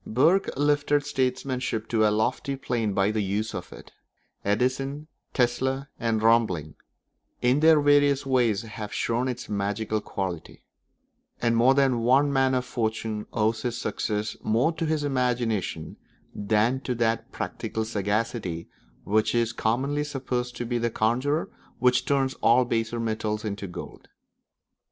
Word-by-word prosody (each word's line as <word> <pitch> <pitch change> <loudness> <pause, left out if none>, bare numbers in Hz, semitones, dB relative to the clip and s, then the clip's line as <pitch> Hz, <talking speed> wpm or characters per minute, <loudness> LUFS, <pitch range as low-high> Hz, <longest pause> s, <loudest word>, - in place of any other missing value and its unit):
Burke 160 - +3
lifted 145 0 +2
statesmanship 130 -4 -1
to 110 -2 +3
a - - +3
lofty 110 +6 0
plane 120 -5 -1
by 100 +1 +2
the 110 0 0
use 105 +3 -2
of - - -6
it; - - -12 0.5
Edison, 130 +7 0 0.3
Tesla, 130 +2 0
and 115 -2 0
Roebling 110 -10 +2 0.7
in 125 +3 +3
their 160 0 +6
various 145 -1 +4
ways 120 -6 +2
have 105 -2 -7
shown 120 +3 0
its 125 -1 -4
magical 105 +2 -1
quality; 95 -6 -5 0.8
and 115 -1 +2
more 125 +3 +5
than 135 -3 +3
one 135 +5 +3
man 135 -1 +3
of 125 0 0
fortune 110 -3 -3
owes 110 0 0
his 120 0 -2
success 105 -3 -2
more 120 +8 +2
to 165 0 -3
his 155 -1 0
imagination 120 - -1 0.4
than 110 +5 +1
to 130 -2 -3
that 115 -1 0
practical 110 0 -4
sagacity 105 -4 -2 0.4
which 110 +3 +1
is 115 -1 +1
commonly 135 +7 0
supposed 130 -4 -3
to 120 - -4
be 120 0 -1
the 120 0 0
conjurer 130 +9 0 0.3
which 125 0 +3
turns 135 -2 +1
all 125 +2 +5
baser 115 0 -1
metals 110 -1 -2
into 100 -1 -4
gold. 90 - -9
120 Hz, 140 wpm, -26 LUFS, 110-135 Hz, 0.8 s, their